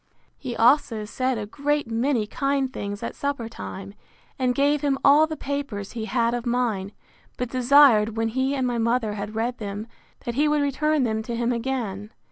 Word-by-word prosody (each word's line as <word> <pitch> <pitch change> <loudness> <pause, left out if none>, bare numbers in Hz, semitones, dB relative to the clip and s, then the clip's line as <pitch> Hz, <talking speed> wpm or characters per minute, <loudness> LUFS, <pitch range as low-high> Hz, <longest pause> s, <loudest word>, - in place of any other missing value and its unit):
He 250 -4 -5
also 230 -3 +3
said 255 +3 -1
a 210 - -3
great 290 +6 -1
many 230 0 0
kind 275 +3 -1
things 200 -3 -5
at - - -4
supper 280 -5 -3
time, 195 -3 -8 0.5
and 250 -1 +1
gave 285 +2 +2
him 280 -2 +1
all 295 +3 +6
the 315 -1 -5
papers 275 -8 -4
he 225 -2 -4
had 235 0 +1
of 240 -1 -2
mine; 235 -6 -1 0.5
but 250 -1 -3
desired, 245 -4 +5
when 225 0 +1
he 260 +4 0
and 260 -2 0
my 240 -1 -1
mother 230 -1 +1
had 205 +1 -6
read 240 +2 -2
them, 205 0 -5 0.4
that 240 - -2
he 290 +5 +2
would 300 -1 +2
return 295 +1 +1
them 220 -2 0
to 235 +1 -5
him 235 +1 0
again. 230 -5 -3
245 Hz, 190 wpm, -24 LUFS, 220-275 Hz, 0.5 s, all